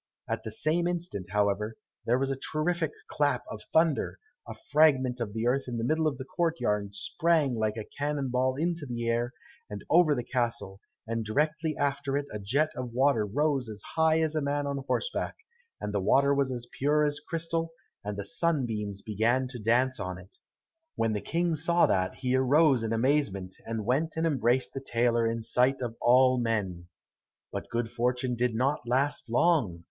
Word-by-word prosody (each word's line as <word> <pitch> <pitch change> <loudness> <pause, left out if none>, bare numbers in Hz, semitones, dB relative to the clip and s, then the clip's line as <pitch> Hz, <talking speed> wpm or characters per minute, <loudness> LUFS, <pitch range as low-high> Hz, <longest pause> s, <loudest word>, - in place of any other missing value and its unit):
At - - -2
the 110 - -5
same 160 +9 0
instant, 170 - -3
however, 105 +2 0 0.3
there 120 +2 +3
was 135 +1 0
a - - 0 0.2
terrific 160 +1 0 0.2
clap 145 -4 0
of 105 - -7
thunder, 160 -2 +2 0.3
a - - -7
fragment 140 -5 +3
of 110 -3 -4
earth 130 +3 +1
in 120 -1 -3
the 115 - -2
middle 155 +5 +1
of 140 -4 -1
the 130 - -6
court 165 +3 -1
yard 105 -1 -1
sprang 160 +3 +1
like 110 -1 -1
a 110 - -4
cannon 145 -2 -1
ball 130 +1 +1
into 165 0 -2
the 120 -1 -3
air, 120 +1 0 0.4
and - - -7
over 160 -3 +5
the 120 - -2
castle, 115 -5 -2 0.2
and 115 0 -2
directly 150 +7 0
after 140 -1 0
it 145 - -2
a 105 - -4
jet 140 +10 +1
of 125 -2 -5
water 125 -4 +2
rose 140 +1 0
as 105 -1 -7 0.2
high 160 0 +4
as 160 -1 0
a 155 - 0
man 145 0 -1
on 140 -1 -2
horseback, 485 - -1 0.4
and 105 - -4
the 100 - 0
water 140 +8 +4
was 140 -1 +1
as 120 -1 -4
pure 150 +2 +3
as 145 0 -1
crystal, 165 0 -3 0.3
and 105 0 -4
the 100 - -4
sunbeams 110 - -1
began 115 +5 +1
to 125 -2 -7
dance 125 +4 +2
on 95 -2 -4
it. 90 +1 -15 0.6
When 115 -1 +1
the 105 - -2
King 170 0 0
saw 170 +3 +3
that 95 -1 0
he 130 -1 0
arose 135 0 +4
in 115 -1 -2
amazement, 115 -7 0
and 115 -2 -3
went 155 +7 0
and 160 - +1
embraced 130 -4 +1
the 135 - -5
tailor 120 -2 +1
in 115 - -2
the 115 - -6
sight 125 +4 +2
of 120 -3 -4
all 130 +1 +5
men. 100 -7 -2 0.6
But - - -5
good 115 -1 -2
fortune 125 +1 0
did 120 -1 0
not 130 +1 0
last 130 +1 0
long. 125 - +2
130 Hz, 190 wpm, -28 LUFS, 115-150 Hz, 0.6 s, over